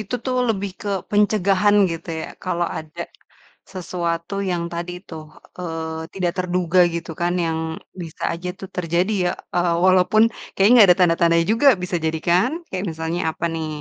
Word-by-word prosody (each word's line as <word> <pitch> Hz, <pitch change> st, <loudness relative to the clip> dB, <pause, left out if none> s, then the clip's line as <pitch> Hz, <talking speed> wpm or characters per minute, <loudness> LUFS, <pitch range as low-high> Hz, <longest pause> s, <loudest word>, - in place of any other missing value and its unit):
itu 215 Hz, +3 st, -5 dB
tuh 255 Hz, -1 st, -1 dB
lebih 200 Hz, -3 st, -1 dB
ke 205 Hz, -, -5 dB, 0.2 s
pencegahan, 205 Hz, -1 st, +3 dB, 0.2 s
gitu 165 Hz, +1 st, -8 dB
ya, -, -, -5 dB, 0.2 s
kalau 175 Hz, -2 st, -1 dB
ada 155 Hz, -1 st, -9 dB, 0.7 s
sesuatu 170 Hz, -1 st, -3 dB, 0.2 s
yang 175 Hz, -1 st, -1 dB
tadi 170 Hz, +1 st, -4 dB, 0.2 s
tuh, 160 Hz, -2 st, -7 dB, 0.4 s
eee, 160 Hz, -2 st, -5 dB
tidak 180 Hz, -3 st, -1 dB
terduga 180 Hz, 0 st, +1 dB
gitu 170 Hz, 0 st, -4 dB
kan, 175 Hz, 0 st, +1 dB
yang 160 Hz, -1 st, -1 dB, 0.4 s
bisa 165 Hz, -2 st, -10 dB
aja 175 Hz, +2 st, -5 dB
tuh 195 Hz, -, -7 dB
terjadi 180 Hz, +3 st, 0 dB
ya, 175 Hz, -, +2 dB, 0.3 s
eee, 175 Hz, -1 st, +2 dB
walaupun 185 Hz, +3 st, +4 dB, 0.3 s
kayaknya 200 Hz, +4 st, +5 dB
nggak 210 Hz, -5 st, +8 dB
ada 175 Hz, -, +6 dB
tanda-tandanya 170 Hz, -1 st, +3 dB
juga, 240 Hz, +6 st, +4 dB
bisa 180 Hz, 0 st, -2 dB
jadi, 160 Hz, 0 st, 0 dB
kan? 180 Hz, +8 st, +4 dB, 0.2 s
Kayak 185 Hz, +1 st, -2 dB
misalnya 160 Hz, +2 st, -3 dB, 0.2 s
apa -, -, -4 dB
nih, 160 Hz, -1 st, -3 dB
175 Hz, 165 wpm, -21 LUFS, 170-190 Hz, 0.7 s, nggak